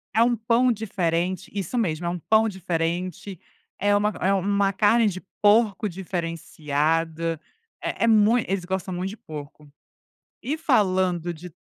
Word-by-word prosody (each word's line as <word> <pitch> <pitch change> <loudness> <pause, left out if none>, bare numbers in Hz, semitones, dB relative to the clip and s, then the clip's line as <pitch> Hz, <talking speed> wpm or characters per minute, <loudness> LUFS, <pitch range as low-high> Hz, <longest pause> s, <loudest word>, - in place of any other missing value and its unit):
Eh, - - +3
é - - +7
um 240 0 +2
pão 235 +3 +2
diferente 185 -3 -2
isso 200 +4 -3
mesmo, 170 -6 -1
é - - 0
um 175 0 -3
pão 220 +5 +3
diferente, 180 0 -3 0.4
é 205 +1 +3
uma 210 +1 +2
é 195 +2 +3
uma 200 +1 +1
carne 225 +2 +4
de 185 -2 -2 0.2
porco 210 0 +4
diferenciada, 165 -2 -2 0.4
é - - -3
é - - +4
mui 225 +1 +4
eles 190 -2 -1
gostam 190 0 -3
muito 180 +2 -3
de 215 - -10
porco. 150 -1 -10 0.8
E 295 +4 -2
falando 185 - +1
de 175 +1 -11
190 Hz, 155 wpm, -24 LUFS, 170-210 Hz, 0.8 s, é